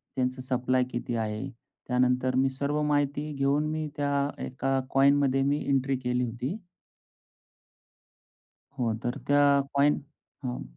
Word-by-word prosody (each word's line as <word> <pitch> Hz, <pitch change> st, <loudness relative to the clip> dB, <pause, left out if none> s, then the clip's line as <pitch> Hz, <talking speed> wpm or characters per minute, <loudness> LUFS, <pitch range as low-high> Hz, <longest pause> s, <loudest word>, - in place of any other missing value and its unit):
त्यांचं 130 Hz, 0 st, -1 dB
सप्लाय 130 Hz, 0 st, +1 dB
किती 120 Hz, 0 st, -3 dB
आहे. 110 Hz, +3 st, -2 dB, 0.4 s
त्यानंतर 125 Hz, 0 st, +2 dB
मी 135 Hz, +1 st, +3 dB
सर्व 140 Hz, +3 st, -1 dB
माहिती 145 Hz, 0 st, 0 dB
घेऊन 140 Hz, +2 st, +1 dB
मी 155 Hz, -1 st, -2 dB
त्या 145 Hz, -1 st, -1 dB, 0.3 s
एका 135 Hz, +1 st, -1 dB
कॉइनमध्ये 135 Hz, 0 st, +4 dB
मी 145 Hz, +2 st, +1 dB
एंट्री 135 Hz, 0 st, +2 dB
केली 125 Hz, 0 st, -1 dB
होती. 125 Hz, -, -4 dB, 2.2 s
हो, 115 Hz, -2 st, +1 dB
तर 120 Hz, 0 st, -2 dB
त्या 145 Hz, 0 st, +4 dB, 0.3 s
कॉइन 140 Hz, +1 st, +3 dB, 0.4 s
हं. 125 Hz, -1 st, -3 dB
135 Hz, 125 wpm, -28 LUFS, 125-145 Hz, 2.2 s, कॉइनमध्ये